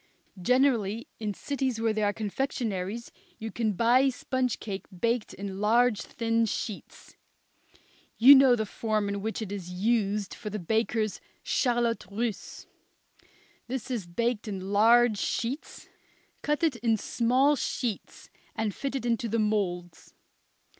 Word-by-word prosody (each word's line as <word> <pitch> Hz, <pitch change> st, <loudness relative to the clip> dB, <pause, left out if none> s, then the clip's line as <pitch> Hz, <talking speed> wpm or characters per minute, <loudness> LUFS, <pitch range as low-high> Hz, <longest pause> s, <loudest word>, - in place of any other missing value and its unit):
Generally, 240 Hz, -, +2 dB
in 210 Hz, -3 st, -3 dB
cities 265 Hz, -4 st, -2 dB
where 225 Hz, -1 st, +1 dB
there 215 Hz, -1 st, +1 dB
are -, -, +2 dB
confectionaries, 220 Hz, -1 st, -3 dB, 0.3 s
you 220 Hz, 0 st, -6 dB
can 220 Hz, -3 st, -1 dB
buy 245 Hz, +6 st, +4 dB
sponge 255 Hz, -1 st, -2 dB
cake 195 Hz, -2 st, -6 dB
baked 230 Hz, +4 st, -1 dB
in 195 Hz, 0 st, -6 dB
large 230 Hz, +1 st, +3 dB
thin 230 Hz, -1 st, 0 dB
sheets. 210 Hz, -1 st, -6 dB, 1.0 s
You 260 Hz, +5 st, +10 dB
know 265 Hz, -2 st, +7 dB
the 220 Hz, -2 st, -2 dB
form 215 Hz, 0 st, -1 dB
in 200 Hz, 0 st, -3 dB
which 220 Hz, +1 st, -3 dB
it 200 Hz, -, -7 dB
is 190 Hz, -3 st, -6 dB
used 205 Hz, +1 st, 0 dB
for 210 Hz, -, -7 dB
the 210 Hz, -, -4 dB
bakers' 220 Hz, +2 st, -1 dB, 0.2 s
charlotte 240 Hz, -4 st, 0 dB
russe. 220 Hz, +1 st, -4 dB, 1.0 s
This 260 Hz, 0 st, -4 dB
is 220 Hz, -8 st, -3 dB
baked 230 Hz, +5 st, -1 dB
in 195 Hz, -1 st, -5 dB
large 230 Hz, +1 st, +5 dB
sheets; 250 Hz, +6 st, -3 dB, 0.5 s
cut 295 Hz, +2 st, -1 dB
it 310 Hz, -7 st, +2 dB
in 225 Hz, -1 st, +1 dB
small 255 Hz, +7 st, +2 dB
sheets 240 Hz, -4 st, -4 dB, 0.2 s
and 215 Hz, -2 st, -1 dB
fit 275 Hz, +5 st, -4 dB
it 265 Hz, -, -3 dB
into 230 Hz, -1 st, 0 dB
the 230 Hz, -, 0 dB
moulds. 190 Hz, -5 st, -2 dB
225 Hz, 140 wpm, -28 LUFS, 205-240 Hz, 1.0 s, You